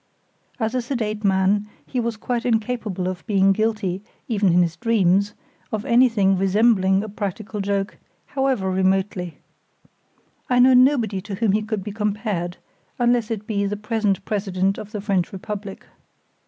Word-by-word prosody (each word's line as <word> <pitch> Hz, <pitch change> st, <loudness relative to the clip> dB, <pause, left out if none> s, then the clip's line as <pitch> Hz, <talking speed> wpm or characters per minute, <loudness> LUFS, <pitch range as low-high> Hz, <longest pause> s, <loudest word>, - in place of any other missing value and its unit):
As 220 Hz, 0 st, -1 dB
a 255 Hz, -, 0 dB
sedate 220 Hz, -4 st, -3 dB
man, 195 Hz, +1 st, +2 dB, 0.2 s
he 255 Hz, -, -3 dB
was 230 Hz, -2 st, -2 dB
quite 240 Hz, +1 st, -2 dB
incapable 220 Hz, -5 st, -1 dB
of 185 Hz, -1 st, -4 dB
being 195 Hz, -2 st, +4 dB
guilty, 210 Hz, -3 st, -1 dB, 0.3 s
even 205 Hz, -5 st, +2 dB
in 175 Hz, +1 st, +5 dB
his 170 Hz, -1 st, -2 dB
dreams, 200 Hz, -3 st, +2 dB, 0.4 s
of 215 Hz, 0 st, -3 dB
anything 225 Hz, -6 st, +4 dB
resembling 195 Hz, -1 st, +3 dB
a -, -, -5 dB
practical 205 Hz, 0 st, -4 dB
joke, 195 Hz, 0 st, -2 dB, 0.3 s
however 265 Hz, -9 st, 0 dB
remotely. 185 Hz, -2 st, 0 dB, 1.1 s
I 250 Hz, -, +3 dB
know 255 Hz, +1 st, +7 dB
nobody 250 Hz, -6 st, +4 dB
to 200 Hz, 0 st, -6 dB
whom 215 Hz, 0 st, +1 dB
he 210 Hz, +2 st, +2 dB
could 215 Hz, -2 st, -3 dB
be 210 Hz, -, -5 dB
compared, 210 Hz, -4 st, -2 dB, 0.4 s
unless 240 Hz, -2 st, +2 dB
it 215 Hz, -2 st, -4 dB
be 200 Hz, -2 st, -1 dB
the 205 Hz, +1 st, -3 dB
present 210 Hz, -3 st, -1 dB
president 195 Hz, -2 st, -1 dB
of 210 Hz, -, -9 dB
the 210 Hz, -2 st, -4 dB
French 195 Hz, -4 st, 0 dB
Republic. 200 Hz, 0 st, -7 dB
210 Hz, 155 wpm, -22 LUFS, 195-225 Hz, 1.1 s, know